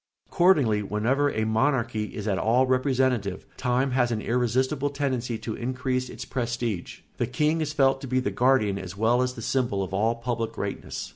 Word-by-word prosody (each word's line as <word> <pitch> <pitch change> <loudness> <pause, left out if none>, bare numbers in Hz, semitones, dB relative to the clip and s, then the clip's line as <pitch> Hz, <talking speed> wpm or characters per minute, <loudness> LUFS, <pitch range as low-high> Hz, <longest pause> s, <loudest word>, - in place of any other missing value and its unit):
Accordingly, 145 - +3
whenever 115 +8 +1
a 110 -4 -1
monarchy 115 -1 +1
is 105 0 -5
at 95 -2 +1
all 120 +4 +3
representative 130 -6 0
time 130 +2 0
has 125 -1 +2
an 110 - -1
irresistible 130 +5 0
tendency 130 -5 -2
to 110 - -5
increase 130 +1 -2
its - - -7
prestige; 120 -6 -3 0.2
the 120 - 0
king 150 +6 +1
is 150 -1 -1
felt 135 -2 +2
to 135 - -6
be 130 +1 +1
the 130 - -1
guardian 125 -6 +2
as 95 0 -8
well 115 +4 +3
as 125 0 -1
the 115 - -7
symbol 120 -7 0
of 95 - -7
all 110 +4 +1
public 115 -1 -3
greatness. - - -5
125 Hz, 185 wpm, -26 LUFS, 110-130 Hz, 0.2 s, Accordingly